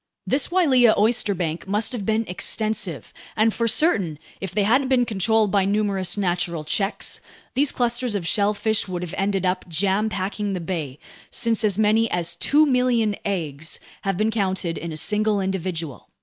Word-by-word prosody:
This 275 - +1
Wailea 265 -11 +4
oysterbank 200 -7 +1
must 210 +3 +1
have 220 -6 -5
been 220 +1 +1
extensive, 205 -1 -1 0.2
and 220 0 +3
for 230 - 0
certain, 200 - +2 0.2
if 195 - -4
they 205 +1 +1
hadn't 255 +6 +3
been 255 -2 +3
controlled 220 0 +1
by 200 -2 +3
numerous 200 -1 0
natural 175 -4 -1
checks, 195 +7 -1 0.3
these 280 +2 +2
clusters 240 -2 -1
of 190 -4 -2
shellfish 210 +2 +1
would 180 -1 -4
have 175 - -6
ended 195 0 0
up 185 0 -1
jam 195 +6 +1
packing 200 +1 -3
the 185 - -2
bay, 160 -6 -4 0.3
since 230 -2 +1
as 205 -3 +2
many 220 +1 +3
as 170 -1 0
2,000,000 250 - +2
eggs 160 -6 -3 0.2
have 195 -3 -1
been 215 +2 +1
counted 190 -5 -1
in 170 0 -5
a 155 - -5
single 210 +4 +1
individual. 180 -6 -4
205 Hz, 165 wpm, -23 LUFS, 180-225 Hz, 0.3 s, Wailea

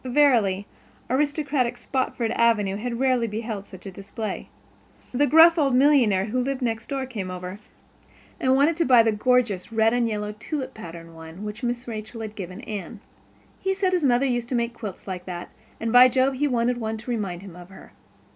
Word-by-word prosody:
Verily, 240 -8 +3 0.5
aristocratic 280 -3 0
Spofford 245 -3 -2
Avenue 225 -5 +2
had 235 +2 -4
rarely 255 -3 +2
beheld 215 -2 -5
such 190 0 -13
a 195 - -6
display. 200 +3 -6 0.6
The 285 +3 +2
gruff 330 +2 +7
old 275 -4 +2
millionaire 250 -9 +4
who 245 +4 -1
lived 270 0 -2
"next 225 -1 -2
door" 270 -2 -2
came 210 -8 -5
over 180 +2 -6 0.8
and 260 0 +3
wanted 295 +4 +3
to 335 - +2
buy 245 -4 +6
the 225 - +2
gorgeous 230 -3 +1
red 225 0 +3
and 245 -1 +2
yellow 210 -1 -3
"tulip 285 +2 -4
pattern" 165 -4 -10
one 160 +4 -10
which 210 +2 -6
Mrs. 240 0 -2
Rachel 220 0 -6
had 215 -1 -6
given 185 -3 -7
Anne. 210 0 -6 0.6
He 385 0 -1
said 380 -1 0
his 355 -3 +1
mother 255 0 +3
used 240 -2 -1
to 255 - -1
make 235 0 -1
quilts 215 -5 -8
like 180 -1 -5
that, 175 -1 -6 0.3
and 225 0 -2
by 250 +1 +9
Jove, 260 +1 +2
he 285 +3 0
wanted 245 -1 0
one 220 -1 -3
to 235 +3 -6
remind 195 -6 -3
him 190 -4 -11
of 175 0 -12
her. 195 - -14
235 Hz, 195 wpm, -24 LUFS, 205-260 Hz, 0.8 s, by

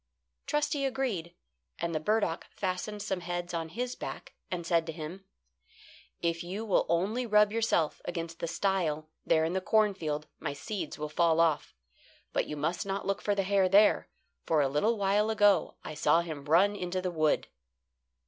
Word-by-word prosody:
Trusty 295 -1 0
agreed, 250 -11 -2 0.4
and 170 0 -2
the 155 - 0
burdock 210 -1 0
fastened 200 +2 -3
some 190 - -2
heads 175 0 -4
on 165 -1 -2
his 245 +7 -3
back, - - -7 0.2
and 175 -2 -3
said 170 -1 +2
to - - -2
him: 165 +4 -7 1.0
"If 170 0 0
you 195 +6 -4
will 205 - +2
only 205 +9 +1
rub 210 -1 +5
yourself 225 -9 +1
against 170 -1 -5
the 170 - -2
stile 160 -5 -1 0.2
there 160 -1 +4
in 165 - -1
the 190 - 0
cornfield, 185 -8 +1
my - - -3
seeds 195 +8 -5
will 150 0 -3
fall 165 +1 +2
off. 165 -3 +2 0.6
But - - 0
you 150 - -5
must 155 +4 -1
not 195 0 -3
look 195 - -1
for 205 - +1
the 195 - +1
hare 195 -1 +3
there, 205 +3 +5 0.3
for 160 - +2
a 140 - +3
little 210 +12 +1
while 205 +2 +2
ago 205 -2 +3
I - - -6
saw 160 +2 +3
him 155 -5 -6
run 185 +7 +4
into 185 -1 -2
the 185 0 -2
wood." 155 -3 +1
180 Hz, 175 wpm, -30 LUFS, 165-205 Hz, 1.0 s, rub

